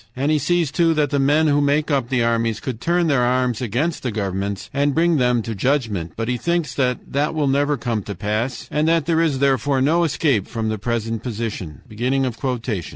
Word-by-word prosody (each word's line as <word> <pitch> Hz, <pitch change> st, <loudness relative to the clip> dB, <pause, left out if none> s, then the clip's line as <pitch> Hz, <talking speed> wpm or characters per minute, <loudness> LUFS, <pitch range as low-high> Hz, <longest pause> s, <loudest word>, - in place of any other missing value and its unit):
And 140 Hz, +4 st, 0 dB
he 155 Hz, -, +3 dB
sees, 165 Hz, +1 st, +1 dB
too, 165 Hz, 0 st, +2 dB
that 150 Hz, -2 st, +1 dB
the 140 Hz, -, +1 dB
men 145 Hz, +3 st, +3 dB
who 145 Hz, -1 st, +3 dB
make 145 Hz, +2 st, +1 dB
up 135 Hz, -4 st, 0 dB
the 125 Hz, -3 st, +1 dB
armies 115 Hz, -2 st, 0 dB
could 120 Hz, -1 st, -5 dB
turn 175 Hz, 0 st, +1 dB
their 140 Hz, -6 st, +2 dB
arms 125 Hz, -1 st, +1 dB
against 130 Hz, +8 st, -1 dB
the 130 Hz, -, -2 dB
governments 100 Hz, -1 st, -3 dB
and 140 Hz, 0 st, +1 dB
bring 165 Hz, 0 st, +3 dB
them 125 Hz, -3 st, +2 dB
to 115 Hz, -, -4 dB
judgment. 105 Hz, -, -1 dB
But 115 Hz, 0 st, -3 dB
he 125 Hz, 0 st, 0 dB
thinks 170 Hz, -1 st, -1 dB
that 125 Hz, -1 st, -2 dB
that 145 Hz, +3 st, 0 dB
will 150 Hz, -2 st, +1 dB
never 145 Hz, +2 st, +1 dB
come 115 Hz, -2 st, -2 dB
to 100 Hz, -, -5 dB
pass, 105 Hz, +7 st, -3 dB
and 150 Hz, +1 st, +1 dB
that 165 Hz, -2 st, +2 dB
there 165 Hz, 0 st, +2 dB
is, 155 Hz, -5 st, +1 dB
therefore, 135 Hz, 0 st, +2 dB
no 160 Hz, +6 st, +3 dB
escape 140 Hz, -, +1 dB
from 110 Hz, -2 st, -3 dB
the 110 Hz, -1 st, -3 dB
present 115 Hz, 0 st, -2 dB
position. 110 Hz, -, -5 dB
130 Hz, 210 wpm, -21 LUFS, 115-150 Hz, -, he